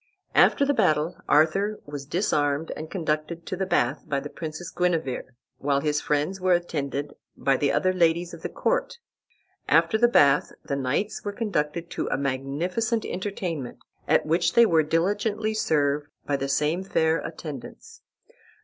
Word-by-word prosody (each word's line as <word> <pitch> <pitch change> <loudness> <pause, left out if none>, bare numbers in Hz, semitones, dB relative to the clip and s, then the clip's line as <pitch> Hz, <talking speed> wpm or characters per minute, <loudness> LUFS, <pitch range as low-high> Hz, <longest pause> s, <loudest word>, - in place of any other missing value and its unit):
After 280 - +5
the 285 - +2
battle 155 - +2
Arthur 195 +8 +3
was 145 -1 -7
disarmed 150 -3 0
and 155 +1 -7
conducted 165 -1 -2
to 190 - -3
the 190 +1 -2
bath 130 -5 +1
by 140 - 0
the 145 +1 -8
princess 160 +1 -6
Guenever, 165 -9 -1 0.2
while 140 0 +1
his 150 -1 0
friends 150 +6 -1
were 185 0 +3
attended 145 -4 -3 0.2
by 135 - +2
the 140 +1 +1
other 185 0 +2
ladies 170 0 +2
of 165 - -9
the - - -4
court. - - -1 0.7
After 220 - +4
the 240 - +6
bath 145 -11 +4
the 140 - -2
knights 140 +10 -1
were 205 - -2
conducted 170 -6 -2
to - - -3
a - - 0
magnificent 150 - -1
entertainment, 180 -8 -4 0.3
at - - +3
which 170 +2 +1
they 235 - +7
were 165 -6 +4
diligently 205 +7 0
served 145 -7 +1 0.2
by 145 - 0
the 140 0 -2
same 150 +6 +1
fair 160 -4 +1
attendants. 160 - -8
160 Hz, 160 wpm, -25 LUFS, 145-185 Hz, 0.7 s, they